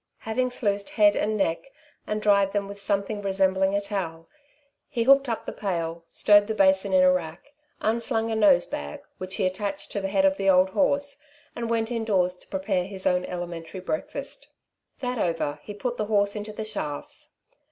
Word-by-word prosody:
Having 255 +3 0
sluiced 205 -5 -1
head 205 -1 +6
and 215 +1 0
neck 170 +2 -1 0.4
and 210 0 -2
dried 200 -2 +4
them 200 -1 -1
with 200 0 -8
something 200 +1 -1
resembling 190 0 +2
a 200 - +1
towel, 170 -5 -4 0.6
he 235 -4 0
hooked 275 +1 +5
up 230 - -3
the - - -5
pail, 170 -4 -3
stowed 205 0 +5
the 220 - -2
basin 190 0 +3
in 185 -1 +5
a 185 - +6
rack, 175 - -4 0.3
unslung 225 0 0
a - - 0
nosebag, 175 - +2 0.2
which 185 0 -5
he 200 - 0
attached 195 +1 -3
to 200 - -2
the 195 - -1
head 195 0 +2
of 190 0 +3
the 195 0 +1
old 185 0 +5
horse, 280 +3 +1 0.4
and 235 -1 -3
went 225 0 0
indoors 200 -6 +1
to - - -17
prepare 190 -1 -1
his 190 0 -7
own 180 0 +2
elementary 175 -1 -6
breakfast. 250 +12 -4 0.5
That 250 -2 -2
over, 165 -5 -1
he 205 - -8
put 245 +3 -3
the 215 - -1
horse 205 -1 +2
into 210 0 -5
the 215 +1 -5
shafts. 150 -9 -5
200 Hz, 185 wpm, -26 LUFS, 185-220 Hz, 0.6 s, head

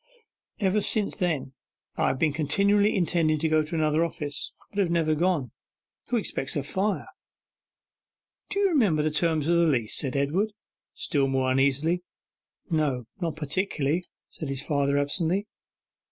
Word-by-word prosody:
Ever 205 0 +2
since 210 0 +1
then 160 -8 -1 0.4
I - - +1
have - - 0
been 155 +1 +1
continually 200 +8 +3
intending 165 -4 +2
to 160 +2 0
go 155 0 +3
to 155 +2 -5
another 155 0 +2
office, 145 -3 -2 0.2
but 205 - -4
have 190 -4 +2
never 165 -2 +2
gone. 155 -6 0 0.6
Who 245 - +1
expects 135 - -1
a 145 - -1
fire?' 195 +8 -1 1.4
'Do 400 - 0
you 400 - +4
remember 205 - +3
the 155 - +1
terms 155 -1 +1
of 170 0 +3
the 170 0 +4
leases?' 120 -8 +1
said 135 -2 -1
Edward, 170 +10 0 0.4
still 140 -2 0
more 130 -1 +1
uneasily. 140 +6 +2 0.7
'No, 145 -6 0
not 165 -4 -2
particularly,' 160 +1 -1 0.3
said 155 - -6
his 135 0 -2
father 140 -1 +1
absently. 165 +7 0
155 Hz, 155 wpm, -26 LUFS, 140-180 Hz, 1.4 s, you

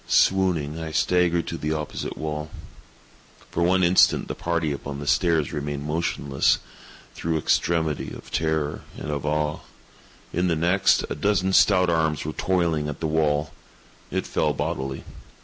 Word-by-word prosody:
Swooning, 85 -5 +2
I 80 -1 -4
staggered 85 0 +2
to - - -5
the 75 +1 -1
opposite 75 -1 -4
wall. 75 0 -4 1.0
For 85 - -1
one 90 +2 +3
instant 90 +1 +4
the - - -3
party 85 -3 -1
upon 70 0 -5
the 70 - -6
stairs 80 -1 +2
remained 75 -1 -4
motionless, 75 -3 +1 0.6
through 80 -1 -1
extremity 80 -1 0
of - - -11
terror 80 -2 -1 0.2
and 75 - -5
of 75 0 -3
awe. 75 0 0 0.7
In 90 +2 +1
the 85 - +2
next, 85 +4 +3
a - - +1
dozen 95 -2 +1
stout 90 -3 +5
arms 80 -2 0
were 75 - -3
toiling 85 -5 0
at 75 - -6
the 80 - -3
wall. 75 -1 +1 0.6
It - - -2
fell - - 0
bodily. 65 0 -3
80 Hz, 150 wpm, -24 LUFS, 75-85 Hz, 1.0 s, stout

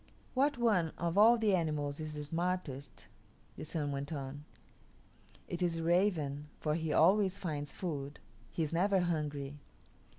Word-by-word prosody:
"What 280 +1 +2
one 205 -9 +2
of 170 0 -1
all 225 +4 +7
the 220 -3 +2
animals 150 -4 0
is 155 -1 -5
the 150 - -4
smartest?" 160 -5 -3 0.5
the - - -7
Sun 150 -2 -2
went 140 +1 -4
on. 145 0 -5 1.0
"It 175 - -4
is 175 -2 +1
the 165 - -3
raven, 165 -5 +1
for 150 - 0
he 160 -1 -1
always 190 +4 +4
finds 150 -7 -3
food; 145 -5 -4 0.3
he 165 - -2
is 155 - -3
never 190 +2 +3
hungry. 145 -4 -2
165 Hz, 155 wpm, -33 LUFS, 145-185 Hz, 1.0 s, all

